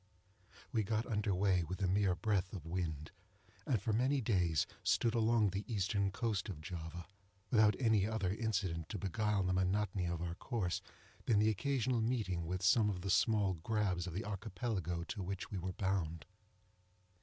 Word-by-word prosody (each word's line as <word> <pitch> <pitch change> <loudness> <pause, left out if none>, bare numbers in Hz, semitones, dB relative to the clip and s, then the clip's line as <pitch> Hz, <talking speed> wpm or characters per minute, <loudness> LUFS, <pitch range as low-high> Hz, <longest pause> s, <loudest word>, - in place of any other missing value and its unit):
We 115 - +2
got 110 +2 -1
under 105 -4 0
way 95 -2 +2
with 90 +4 -5
a - - +3
mere 95 0 +2
breath 100 +1 0
of 90 -6 -6
wind, 80 -3 -3 0.6
and 120 - +2
for 110 - -1
many 130 +5 +2
days 90 - +2 0.2
stood 115 -2 +2
along 115 -3 +3
the 100 +3 -2
eastern 100 -1 +1
coast 105 0 -2
of 90 -6 -5
Java, 80 +1 -6 0.5
without 110 -3 +5
any 110 -5 +3
other 105 -5 -1
incident 95 -7 -1
to 105 - -3
beguile 100 +2 0
the 95 0 +1
monotony 95 0 +1
of 85 -1 -2
our 85 -1 -3
course 95 -1 -2 0.5
than 110 - +4
the 105 +1 +4
occasional 125 +1 0
meeting 105 -8 -1
with 90 +1 -3
some 110 +1 +5
of 90 -3 -3
the 100 +1 -1
small 100 +1 +3
grabs 90 0 -1
of 90 - -5
the 100 +5 -3
Archipelago 95 -4 -3
to 100 +3 -5
which 95 +1 -4
we 100 - -2
were 90 +1 -3
bound. 90 -5 -1
100 Hz, 175 wpm, -36 LUFS, 90-110 Hz, 0.6 s, without